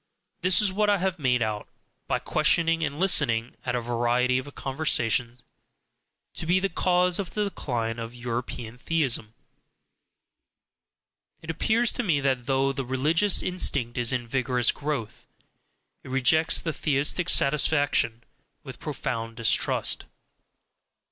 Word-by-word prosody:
This 185 +2 +4
is 195 -2 0
what 210 +1 +1
I 205 - +3
have 185 -1 -2
made 125 -4 +1
out 105 -1 -4 0.4
(by - - 0
questioning 165 +2 +1
and 145 0 -3
listening 125 -11 +2
at 125 - 0
a 120 - -1
variety 120 +2 +1
of 140 +2 -10
conversations) 125 -4 0 0.9
to 160 - -6
be 180 +2 +3
the 195 +1 -1
cause 180 +1 +1
of 190 -4 -5
the 210 - +1
decline 120 - -3
of 115 +1 -7
European 120 -1 -5
theism; 125 -9 -1 2.1
it 160 - -4
appears 225 +8 +2
to - - -1
me 170 -11 +1
that 130 -3 -1
though 135 0 +1
the 135 0 -3
religious 155 +10 +2
instinct 145 -9 0
is 120 -1 +2
in 125 -2 -2
vigorous 125 -1 +1
growth, 140 -7 -5 0.8
it - - -11
rejects 155 +5 +3
the 165 - -3
theistic 150 +4 0
satisfaction 140 -5 +3 0.4
with - - -10
profound 115 0 -5
distrust. 115 - +1
135 Hz, 135 wpm, -26 LUFS, 120-165 Hz, 2.1 s, This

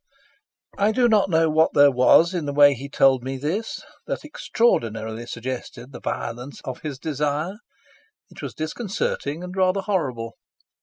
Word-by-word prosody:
I 205 +2 +3
do 245 +1 +3
not 210 -4 +3
know 165 -1 +3
what 160 +1 +2
there 145 0 +7
was 135 +7 +5
in 170 -5 -2
the 145 - -2
way 145 0 +7
he 140 +2 -8
told 135 -3 +3
me 135 +1 -4
this 170 - -3 0.2
that - - -4
extraordinarily 115 - -1
suggested 125 +1 -6
the 125 - -9
violence 125 +4 -5
of 130 - -6
his 150 -4 -5
desire. 150 +6 -2 0.7
It - - -11
was - - -6
disconcerting 160 -2 -3
and 180 +1 -7
rather 190 +1 +2
horrible. 130 - -2
145 Hz, 155 wpm, -23 LUFS, 130-185 Hz, 0.7 s, there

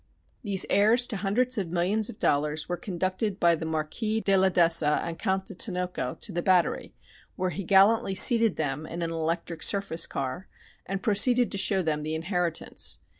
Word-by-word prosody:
These 200 -3 +1
heirs 220 +5 +3
to 225 -4 -5
hundreds 225 +5 0
of 175 -4 -5
millions 190 +5 0
of - - -10
dollars 150 +1 -1
were 175 - -3
conducted 190 +1 -4
by 170 0 +3
the 160 0 -4
"Marquis 160 +8 -3
de 195 -3 +1
la 190 0 +3
d'Essa 165 -4 +3
and 165 -1 -6
Count 190 -2 -2
de 200 - -5
Tinoco" 180 - -2
to 210 - 0
the 175 -1 -3
Battery, 180 -2 0 0.4
where 185 0 -3
he 185 +5 -6
gallantly 195 +2 +3
seated 230 +1 +6
them 150 0 -4
in 170 +1 -6
an 165 - -4
electric 165 0 -4
surface 195 -5 +2
car, 135 +7 -5 0.4
and 195 0 -5
proceeded 240 +3 +2
to 200 - -4
show 190 -1 +1
them 155 -2 -2
the 155 +1 -4
inheritance. 170 0 -2
185 Hz, 180 wpm, -26 LUFS, 165-200 Hz, 0.4 s, seated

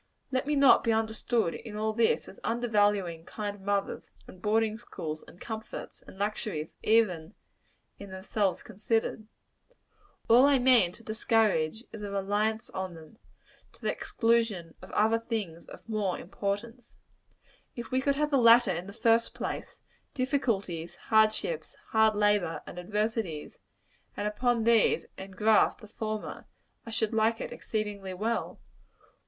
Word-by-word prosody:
Let 260 +1 -1
me 300 - +1
not 275 -2 +6
be 230 - +2
understood, 220 -2 0
in 220 -3 -8
all 215 +1 -1
this, 230 0 +2
as - - -12
undervaluing 205 -7 +1
kind 205 +1 -5
mothers, 200 0 -2 0.2
and 185 - -14
boarding 220 +1 +1
schools, 155 -9 -6
and 175 - -15
comforts 220 -1 -7
and - - -15
luxuries, 200 -6 -3
even 205 -6 +2 0.6
in 200 - -9
themselves 190 +1 -1
considered. 220 +1 -2 1.0
All 245 +4 +7
I 285 -1 +5
mean 245 -8 +5
to 230 - -12
discourage, 220 -4 +1
is, 220 - -8
a 205 - -4
reliance 210 +3 -1
on 185 -2 -4
them, 160 +7 -14 0.5
to - - -22
the - - +1
exclusion 225 -8 0
of - - -11
other 220 +2 +3
things 210 -8 -4
of - - -13
more 210 -5 -1
importance. 215 +6 -5 0.8
If 235 -2 -7
we 260 +1 +2
could 280 +1 +1
have 300 +1 0
the 280 - +4
latter 235 -3 +6
in 175 +3 -5
the 200 - -9
first 230 +1 +2
place - - -5 0.4
difficulties, 225 - -1 0.2
hard 220 0 +6
ships, 485 - -4
hard 220 -1 +4
labor, 205 -5 +1
and 180 - -8
adversity 210 -4 -2 0.7
and 205 - -1
upon 235 +2 +1
these 230 -1 +3
engraft 195 +3 +2
the 215 - -12
former, 215 0 -5 0.4
I - - -5
should 220 0 0
like 225 +1 +2
it - - -5
exceedingly 205 -3 -4
well. 225 +5 -2
215 Hz, 145 wpm, -29 LUFS, 195-230 Hz, 1.0 s, All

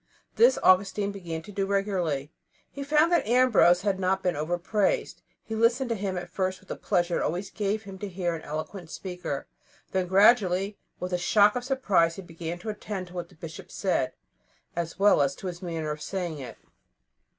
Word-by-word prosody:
This 475 +2 +5
Augustine 200 +2 +4
began 170 -5 -6
to 205 - -10
do 195 -1 -1
regularly. 180 -8 -1 0.4
He 280 - -6
found 305 +4 +3
that 345 - +2
Ambrose 230 -7 +5
had 200 -2 0
not 190 0 +1
been 180 -2 +1
overpraised. 175 +7 0 0.2
He 225 - -7
listened 235 +3 +2
to 230 - +1
him 195 -2 -3
at 175 0 -6
first 185 0 -1
with 190 - -23
the - - -3
pleasure 175 -3 0
it - - -2
always 185 +5 -2
gave 210 +1 -1
him 195 -1 -10
to 205 - -4
hear 175 -2 -2
an 165 - -5
eloquent 155 +3 -6
speaker; 180 -6 -5 0.5
then, 185 -1 0
gradually, 195 0 +4 0.2
with 180 0 -4
a 180 - +1
shock 205 +4 +4
of 250 - -2
surprise, 200 -11 +2
he 195 - -8
began 170 0 -6
to 185 +5 -7
attend 205 -3 -5
to - - -14
what 175 -1 -5
the - - -19
Bishop 160 0 -9
said, - - 0 0.6
as 170 -1 -3
well 200 -5 +5
as 140 0 +1
to - - -11
his 175 -2 -5
manner 165 -4 -3
of 150 0 -6
saying 175 -5 -3
it. 130 - -8
185 Hz, 195 wpm, -27 LUFS, 175-205 Hz, 0.6 s, This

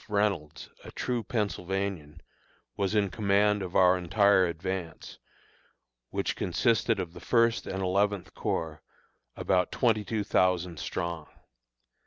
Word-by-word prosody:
Reynolds, 100 -7 -1 0.2
a - - -10
true 125 -2 -2
Pennsylvanian, 95 -7 -3 0.5
was 100 +1 -1
in 100 -3 +2
command 105 0 +2
of 90 -2 -6
our 90 0 +5
entire 95 +1 +4
advance, 85 0 -5 0.9
which - - -2
consisted - - +1
of 85 -2 -4
the - - -10
First 115 -1 +2
and 95 0 -3
Eleventh 100 0 0
Corps, 80 -2 -3 0.5
about 90 -2 +1
twenty 110 -4 +2
two 105 +2 -2
thousand 90 -4 +1
strong. 85 -3 -4
95 Hz, 120 wpm, -28 LUFS, 90-105 Hz, 0.9 s, our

